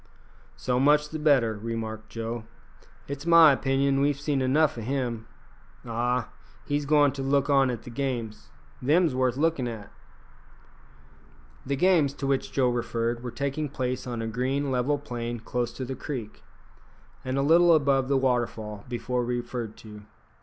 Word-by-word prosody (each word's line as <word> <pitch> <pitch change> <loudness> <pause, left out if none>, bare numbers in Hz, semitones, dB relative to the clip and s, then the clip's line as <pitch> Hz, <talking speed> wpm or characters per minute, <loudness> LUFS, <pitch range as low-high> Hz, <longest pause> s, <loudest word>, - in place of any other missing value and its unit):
"So 125 -1 0
much 150 +2 +4
the 155 - -5
better," 135 -8 +3
remarked 110 -1 -5
Joe; 115 0 -5 0.6
"it's 140 +3 -6
my 165 -2 +8
opinion 135 0 +1
we've 140 0 +1
seen 145 -2 -1
enough 145 +4 +2
o' 115 - -6
him. 120 -2 -3 0.6
Ah! 120 0 -1 0.4
he's 145 0 -1
goin' 145 -1 +4
to 135 - -6
look 140 +1 +1
on 135 -2 +4
at 120 -3 -4
the 120 - -9
games. 115 - -4 0.3
Them's 155 +3 +3
worth 130 -1 +1
lookin' 155 -4 +1
at." 110 -3 -7 1.8
The 140 - 0
games 160 -3 +3
to 140 - -5
which 135 -1 0
Joe 130 -2 +2
referred 120 0 -2
were 125 - -5
taking 140 +4 -3
place 130 -1 -3
on 120 -2 -3
a - - -3
green 130 +5 -1
level 130 +3 +1
plain 120 -4 -5
close 120 +1 -2
to 130 +2 -5
the 130 - -4
creek, 125 -9 -6 0.8
and 130 +1 -2
a 135 - +2
little 170 +3 +6
above 135 -3 +2
the 140 0 +2
waterfall 120 -5 -1
before 125 0 -2
referred 120 -2 -4
to. 105 -1 -10
130 Hz, 160 wpm, -26 LUFS, 120-140 Hz, 1.8 s, my